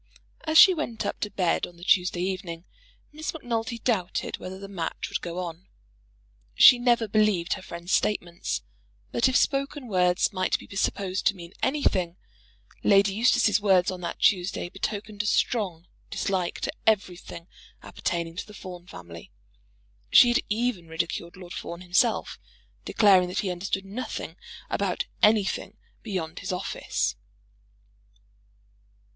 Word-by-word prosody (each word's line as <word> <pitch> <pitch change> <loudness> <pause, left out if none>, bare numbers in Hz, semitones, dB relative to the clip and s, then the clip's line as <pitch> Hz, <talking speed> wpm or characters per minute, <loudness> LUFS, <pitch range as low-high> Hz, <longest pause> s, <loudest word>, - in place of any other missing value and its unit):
As 315 0 +2
she 380 +1 +10
went 275 -9 -3
up - - -3
to 210 - -2
bed 180 -4 0
on 175 - -16
the 175 - -14
Tuesday 180 -1 +2
evening, 185 -3 -4 0.5
Miss 310 +1 -4
Macnulty 235 -4 -3
doubted 215 -7 -1
whether 185 +1 -7
the 195 +1 -8
match 175 -5 -4
would - - -3
go 175 0 -5
on. 175 0 -6 0.9
She 250 - +9
never 240 -2 +2
believed 210 -5 +2
her - - -6
friend's 175 0 -7
statements; 175 -4 -1 0.5
but 235 - +3
if 260 - -2
spoken 275 -1 +1
words 180 -2 +2
might 185 -1 +1
be - - -12
supposed 195 -1 0
to - - +3
mean 170 0 -11
anything, 185 - 0 0.7
Lady 200 -1 +5
Eustace's 220 -1 +3
words 190 -3 +4
on 185 -1 -7
that 175 - -4
Tuesday 180 -2 +1
betokened 205 +2 -4
a 205 - -3
strong 190 -8 0 0.2
dislike 185 -3 -2
to - - -2
everything 180 -5 -1 0.4
appertaining 170 -1 -3
to - - -5
the 210 - -12
Fawn 180 -2 -9
family. 85 - -11 0.8
She 240 - +8
had 240 - +3
even 215 -5 -1
ridiculed 170 +1 -4
Lord 180 -1 -10
Fawn 170 +1 -6
himself, 185 +6 +1 0.5
declaring 190 -4 +5
that 180 - -2
he 190 - -2
understood 190 +2 -3
nothing 215 +6 -5 0.3
about - - -1 0.2
anything 210 -1 +2 0.2
beyond 180 -7 -4
his - - -4
office. 180 +1 -2
190 Hz, 140 wpm, -26 LUFS, 175-220 Hz, 0.9 s, she